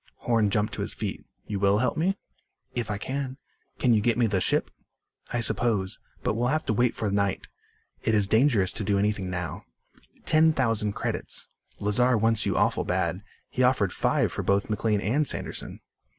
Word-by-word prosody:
Horn 115 -3 +2
jumped 105 +1 0
to - - -4
his - - -3
feet. - - -4 0.2
"You 100 -2 -3
will 100 +1 +3
help 125 +3 +1
me?" 190 +5 +1 0.6
"If 120 -3 -2
I 105 - -1
can." 130 +3 -4 0.4
"Can 125 -3 +3
you 110 - +3
get 120 +2 +1
me 120 - +3
the 100 -4 +1
ship?" - - +1 0.6
"I 120 - 0
suppose. 110 -3 0 0.2
But - - +1
we'll 120 +3 0
have 155 +4 0
to - - +1
wait 120 +2 +2
for 105 -2 -1
night. 100 -1 0 0.6
It 110 - +1
is 105 -2 +2
dangerous 110 -4 +3
to 110 - -1
do 100 0 +1
anything 100 -2 0
now. 90 -2 -4 0.6
Ten 160 0 +5
thousand 115 -6 0
credits. - - -4 0.3
Lazar 115 +4 +3
wants 115 0 +2
you - - 0
awful - - +2
bad. 90 0 -1 0.3
He 130 - -3
offered 125 -7 +3
five - - +1
for - - -3
both 100 +2 +1
McLean 105 -1 +1
and 140 +9 +1
Sanderson." - - -4
110 Hz, 185 wpm, -27 LUFS, 100-125 Hz, 0.6 s, Ten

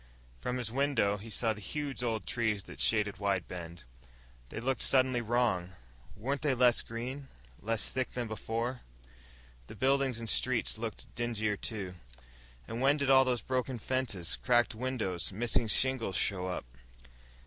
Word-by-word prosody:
From 125 - -2
his 120 -3 -3
window, 130 -6 +2
he 105 +3 -10
saw 110 +1 +1
the 105 - -11
huge 145 +3 -3
old 115 -3 -1
trees 110 -4 0
that - - -11
shaded 105 -2 +2
Wide 100 -3 0
Bend. 85 -3 -8 0.7
They - - -5
looked 130 +3 -1
suddenly 130 -2 +3
wrong. 110 -6 +1 0.4
Weren't 135 +6 -2
they 145 -4 +2
less 125 -1 +5
green, 130 +4 -5 0.3
less 115 0 0
thick 130 -1 -2
than 120 -2 -2
before? 115 +3 -3 0.9
The - - -9
buildings 135 -2 +2
and 115 -1 -5
streets 120 -2 +1
looked 115 -1 -6
dingier, 110 -3 0
too. 100 -3 -3 0.7
And 115 - -4
when 140 +2 +4
did 140 -2 +2
all 135 0 +7
those 125 -2 +1
broken 130 -1 -1
fences, 115 -8 -1
cracked 120 -1 +3
windows, 110 -8 -2
missing 115 +3 +2
shingles 125 -3 +2
show 95 -2 0
up...? 90 - -3
120 Hz, 155 wpm, -32 LUFS, 105-130 Hz, 0.9 s, all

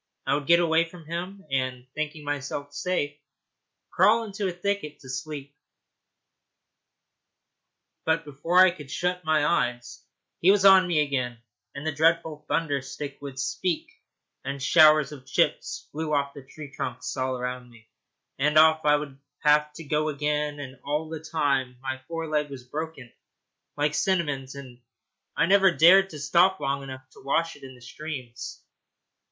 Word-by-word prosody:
I - - +1
would 145 -1 -2
get 170 0 +6
away 165 -1 +3
from 170 -2 -13
him, 180 +4 -6
and, 130 -2 -1
thinking 155 0 -4
myself 145 0 -4
safe, 145 -3 -2 0.8
crawl 230 +2 +4
into 205 -2 -3
a - - -1
thicket 180 -4 -3
to 130 - -12
sleep; 145 +1 -6 2.5
but 160 0 0
before 165 +6 +4
I 185 - +4
could 150 -6 -11
shut 180 +3 -2
my 155 -1 +2
eyes 120 -7 -1 0.4
he 180 - +4
was 200 0 +4
on 190 -1 +8
me 165 -4 +2
again, 125 -5 -2 0.3
and 140 +2 -7
the 160 - 0
dreadful 160 0 +1
thunder 145 -4 0
stick 140 +1 -7
would 140 -2 -8
speak, 165 +5 -2 0.5
and 140 +1 -4
showers 155 +1 +5
of 135 -3 -11
chips - - 0
flew 155 +1 -4
off 140 0 0
the 140 - -10
tree 145 -1 -10
trunks 125 -2 -5
all 130 -1 -2
round 125 0 -5
me, 115 -2 -19 0.5
and 150 +2 +2
off 160 0 +6
I 150 0 +5
would 145 -2 -5 0.2
have 150 0 +4
to 165 - -9
go 155 +1 0
again. 150 0 -1
And 130 -2 -8
all 150 +2 -2
the 160 -1 -5
time 140 -5 -1
my 130 0 -5
fore 165 -1 -4
leg 150 -1 0
was 135 -3 -9
broken, 145 -2 -7 0.6
like 150 0 +1
Cinnamon's, 145 -7 -1
and 130 -3 -11 0.6
I 165 - +4
never 195 +1 +5
dared 185 +3 +6
to 155 - -9
stop 175 +7 +3
long 140 +1 -1
enough 130 -1 -9
to - - -16
wash 165 +4 0
it 145 - -17
in 130 -1 -11
the 125 - -18
streams. 130 -3 -7
150 Hz, 165 wpm, -26 LUFS, 135-165 Hz, 2.5 s, on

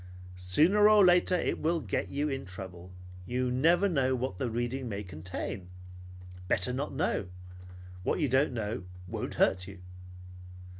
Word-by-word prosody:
Sooner 160 - +4
or 210 -2 +7
later 180 0 +4
it 175 - -1
will 165 +2 +1
get - - -3
you 145 +2 -1
in 135 -2 -3
trouble. 90 -1 -9 0.4
You 125 +2 -1
never 170 +9 +3
know 135 -7 +1
what 125 -7 -3
the 125 - -1
reading 120 +2 -3
may 100 -1 -4
contain. 90 +1 -6 0.8
Better 90 +7 0
not 140 +3 -3
know. 135 - -1 0.7
What 90 - -1
you 150 - +2
don't 130 +3 +2
know 105 -4 -3 0.2
won't - - -5
hurt 90 -1 +2
you." 100 0 -10
125 Hz, 150 wpm, -30 LUFS, 95-150 Hz, 0.8 s, or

